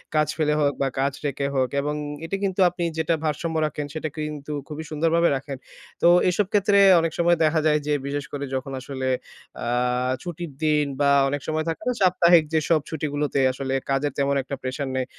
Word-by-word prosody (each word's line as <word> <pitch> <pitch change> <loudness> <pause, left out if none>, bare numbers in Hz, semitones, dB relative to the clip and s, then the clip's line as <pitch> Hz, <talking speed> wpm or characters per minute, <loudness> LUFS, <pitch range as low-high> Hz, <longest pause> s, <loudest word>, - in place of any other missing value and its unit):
কাজ 155 0 +3
ফেলে 150 -1 +2
হোক 145 -1 +2
বা 135 - +2
কাজ 135 0 +1
রেখে 140 0 -1
হোক। 130 -1 +2
এবং 150 +1 -2 0.3
এটা 195 - -3
কিন্তু 195 0 -1
আপনি 175 0 -5
যেটা 160 +1 +1
ভারসাম্য 160 +2 -2
রাখেন, 150 -1 -3
সেটা 155 0 -3
কিন্তু 150 -1 -5 0.2
খুবই 155 0 -6
সুন্দরভাবে 165 +2 +2
রাখেন। 135 0 -5 0.4
তো - - +5 0.2
এসব 200 +3 +1
ক্ষেত্রে 200 0 +3 0.2
অনেক 165 0 0
সময় 170 0 +4
দেখা 155 +1 +3
যায় 150 -1 +3
যে, 150 - +2
বিশেষ 145 0 -3
করে 140 0 -3
যখন 135 +1 -4
আসলে 130 0 -4 0.6
আ - - -3 0.6
ছুটির 175 -3 -6
দিন 150 -1 +3 0.2
বা 140 - +4 0.2
অনেক 145 0 -2
সময় 155 0 -1
থাকে 165 - -4
না 250 - +1
সাপ্তাহিক 175 -2 +5
যেসব 160 0 +2
ছুটিগুলোতে 145 -2 -2
আসলে, 135 0 -4 0.2
কাজের 135 +1 +1
তেমন 140 0 +1
একটা 140 - -5
প্রেশার 130 +2 -3
নেই। 130 - 0
150 Hz, 190 wpm, -24 LUFS, 140-165 Hz, 0.6 s, তো